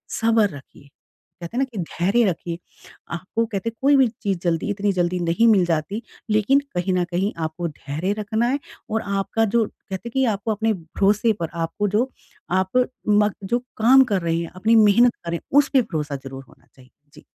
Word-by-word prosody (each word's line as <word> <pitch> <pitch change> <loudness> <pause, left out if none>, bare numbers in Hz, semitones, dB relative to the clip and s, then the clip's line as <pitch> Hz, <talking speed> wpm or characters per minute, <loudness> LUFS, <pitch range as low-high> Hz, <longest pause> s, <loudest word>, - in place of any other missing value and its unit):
सब्र 225 -2 +3
रखिए, 140 0 -17 0.5
कहते 170 +7 -6
हैं - - +2
ना - - +1
कि 225 - -9
धैर्य 185 +7 +1
रखिए। 170 -2 -2 0.6
आपको 190 +7 -2
कहते 220 0 -3
हैं 230 - -14
कोई 280 +2 +5
भी 265 -2 +5 0.2
चीज़ 195 -3 0
जल्दी, 170 0 0
इतनी 205 0 0
जल्दी 180 0 0
नहीं 175 +7 +2
मिल 200 -5 +5
जाती 170 +6 -1 0.3
लेकिन 215 +6 +4 0.2
कहीं 180 +1 0
न 180 -1 +2
कहीं 190 +4 0
आपको 160 +2 -3
धैर्य 155 +6 -3
रखना 220 +3 0
है। 280 - 0 0.3
और 220 0 0
आपका 200 +2 0
जो 225 +2 +2
कहते 195 +4 -8
हैं - - -16
कि 265 0 +2
आपको 210 +3 -3
अपने 220 +1 +1
भरोसे 200 +5 +1
पर 165 - -2 0.2
आपको 205 +5 -2
जो 225 +7 +1 0.4
आप 185 +1 +1 0.4
म 210 0 +4
जो 235 +6 0 0.2
काम 255 +4 +6
कर 190 - +1
रहे 165 -1 0
हैं, 170 - -4
अपनी 220 +5 +2
मेहनत 225 +3 +5
कर 170 - -9
रहे - - -1
हैं, 270 - -2
उसपे 280 -2 +3
भरोसा 155 -9 -3
ज़रूर 135 0 -8
होना - - -23
चाहिए। 130 -1 -19 0.2
जी। - - -16
200 Hz, 200 wpm, -22 LUFS, 175-225 Hz, 0.6 s, काम